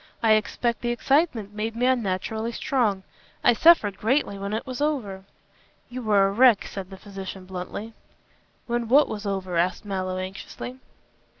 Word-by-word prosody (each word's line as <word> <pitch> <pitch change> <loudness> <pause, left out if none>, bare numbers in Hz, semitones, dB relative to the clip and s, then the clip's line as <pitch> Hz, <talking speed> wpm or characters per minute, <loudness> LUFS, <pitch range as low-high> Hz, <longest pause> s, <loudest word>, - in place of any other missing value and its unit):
I 225 - +5
expect 230 +2 +1
the 240 - -1
excitement 240 - +1
made 220 +2 -3
me 245 +2 0
unnaturally 220 -2 0
strong. 225 -10 0 0.4
I - - +6
suffered 220 - +5
greatly 240 -1 +1
when 200 +1 -4
it 220 +2 -2
was 255 +1 -6
over." 215 -11 -2 0.7
"You 255 +1 -5
were 205 -4 +4
a - - -1
wreck," 235 0 +5
said 190 -2 -7
the 190 - -10
physician 195 -1 -8
bluntly. 190 +4 -6 0.7
"When 240 -1 -2
what 280 +6 +5
was 210 -1 -5
over?" 190 -3 -2
asked 180 +4 0
Mallow, 185 -2 -3
anxiously. 195 +7 -7
215 Hz, 160 wpm, -25 LUFS, 195-240 Hz, 0.7 s, I